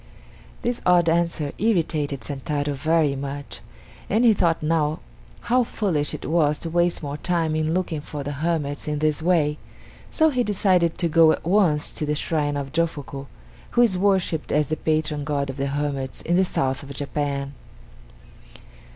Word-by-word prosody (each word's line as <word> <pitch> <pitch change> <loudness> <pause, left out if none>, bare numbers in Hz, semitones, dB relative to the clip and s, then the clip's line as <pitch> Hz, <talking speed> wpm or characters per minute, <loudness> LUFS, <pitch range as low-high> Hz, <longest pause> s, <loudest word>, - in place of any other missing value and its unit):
This 240 0 -1
odd 175 -2 +4
answer 165 -3 0
irritated 160 - 0
Sentaro 145 +2 -3
very 155 0 +1
much, 140 +1 -6 0.5
and 225 +5 +3
he 225 - +7
thought 170 -5 +1 0.8
how 250 +2 +2
foolish 175 -11 -1
it - - -8
was 150 -2 +2
to 165 - -4
waste 175 -1 +1
more 145 0 -4
time 165 -1 0
in 155 +1 0
looking 170 -5 -2
for 145 -1 -6
the 145 - -4
hermits 145 -1 -2
in 150 0 -1
this 155 0 0
way, 155 -3 +2 0.5
so 315 -1 +3
he 250 -3 +1
decided 185 -5 +2
to 170 - +1
go 165 0 +6
at - - -3
once 170 -5 +2
to 150 - -4
the 150 - 0
shrine 145 -1 -1
of 140 -1 -4
Jofuku, 145 -4 -2 0.5
who - - +7
is 220 -6 +3
worshipped 185 -4 +1
as 150 -2 +1
the 155 - 0
patron 155 -2 -1
god 140 -2 -1
of 135 - -12
the 140 0 -1
hermits 140 -2 -3
in 175 - +1
the 190 +1 +4
South 130 -6 -1
of 140 - -10
Japan. 140 0 -3
155 Hz, 170 wpm, -23 LUFS, 145-175 Hz, 0.8 s, he